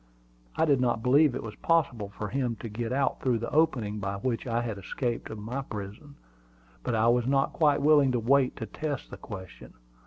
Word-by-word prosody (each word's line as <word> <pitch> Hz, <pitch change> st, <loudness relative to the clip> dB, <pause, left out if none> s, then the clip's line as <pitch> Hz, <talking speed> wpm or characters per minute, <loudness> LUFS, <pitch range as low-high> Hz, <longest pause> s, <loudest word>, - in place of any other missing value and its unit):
I -, -, +3 dB
did 140 Hz, -5 st, +3 dB
not 120 Hz, -3 st, +1 dB
believe 140 Hz, +1 st, +4 dB
it -, -, -4 dB
was 110 Hz, -2 st, -6 dB
possible 135 Hz, -11 st, +1 dB
for 105 Hz, +1 st, -6 dB
him 125 Hz, -2 st, -1 dB
to 115 Hz, +2 st, -7 dB
get 115 Hz, +2 st, -4 dB
out 135 Hz, 0 st, 0 dB
through 125 Hz, -3 st, +2 dB
the 115 Hz, +1 st, -4 dB
opening 120 Hz, -9 st, +1 dB
by 100 Hz, 0 st, -3 dB
which 115 Hz, +5 st, -2 dB
I 115 Hz, 0 st, 0 dB
had 110 Hz, -4 st, -4 dB
escaped 120 Hz, +4 st, -3 dB
from 105 Hz, -2 st, -8 dB
my 125 Hz, +5 st, -3 dB
prison; 110 Hz, +4 st, -8 dB, 0.7 s
but 120 Hz, -, -1 dB
I 110 Hz, +1 st, +3 dB
was 120 Hz, 0 st, +2 dB
not 135 Hz, 0 st, +2 dB
quite 150 Hz, -3 st, +3 dB
willing 145 Hz, -3 st, +5 dB
to 120 Hz, -, +1 dB
wait 130 Hz, +3 st, +3 dB
to 115 Hz, -, -5 dB
test 145 Hz, +5 st, -5 dB
the -, -, -7 dB
question. 95 Hz, -5 st, -10 dB
120 Hz, 210 wpm, -28 LUFS, 110-140 Hz, 0.7 s, willing